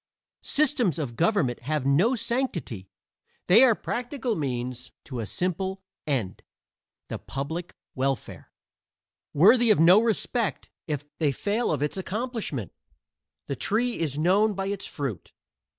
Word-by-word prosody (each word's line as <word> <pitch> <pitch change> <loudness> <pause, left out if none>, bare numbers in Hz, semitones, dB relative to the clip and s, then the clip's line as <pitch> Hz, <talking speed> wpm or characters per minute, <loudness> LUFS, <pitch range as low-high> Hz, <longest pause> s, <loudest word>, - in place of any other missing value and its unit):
Systems 275 - +2
of 135 -7 -4
government 165 - +1
have 145 +2 -2
no 175 - +3
sanctity; 195 - -3 0.6
they 215 +8 +7
are 240 -4 +6
practical 245 0 -3
means 125 -4 -3
to 130 -3 -6
a 110 - -3
simple 190 - -2 0.2
end 120 -10 -1 0.7
the - - -5
public 160 +6 -5 0.2
welfare; 135 0 -3 0.8
worthy 225 - +5
of 210 - +5
no 180 +6 +7
respect 230 -1 -1 0.2
if 150 -2 -3
they 150 -3 +2
fail 210 - -1
of 145 -2 0
its 150 - -2
accomplishment. 200 - -4 0.7
The 140 - -3
tree 235 - 0
is 150 -4 -1
known 195 +6 +3
by 195 +1 -2
its 200 -1 -4
fruit. 135 - -5
175 Hz, 130 wpm, -26 LUFS, 140-220 Hz, 0.8 s, they